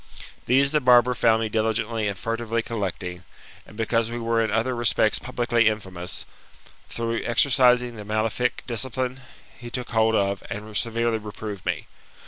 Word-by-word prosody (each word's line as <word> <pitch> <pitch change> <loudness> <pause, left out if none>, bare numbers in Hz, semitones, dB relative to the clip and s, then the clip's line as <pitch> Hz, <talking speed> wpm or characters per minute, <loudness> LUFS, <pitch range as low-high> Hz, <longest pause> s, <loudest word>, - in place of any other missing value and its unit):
These 135 +3 +4
the 150 -1 +2
barber 125 -1 +6
found 115 -2 +3
me - - 0
diligently 110 0 0
and 100 -1 -3
furtively 115 +2 -2
collecting; 95 -5 -4 0.4
and - - -14
because 115 0 +1
we 120 - -4
were 115 -1 +1
in 110 - -1
other 115 +4 0
respects 115 -2 +2
publicly 120 -2 +1
infamous, 95 -5 -3 0.6
through 115 0 -2
exercising 125 -1 +3
the 105 - -7
malefic 110 +3 -1
discipline, 130 +2 -3 0.4
he 120 0 -8
took 125 0 -5
hold 110 -1 +3
of, 100 -1 +1
and 105 +1 -7
severely 115 0 0
reproved 105 -2 -7
me. - - -1
115 Hz, 150 wpm, -24 LUFS, 110-120 Hz, 0.6 s, barber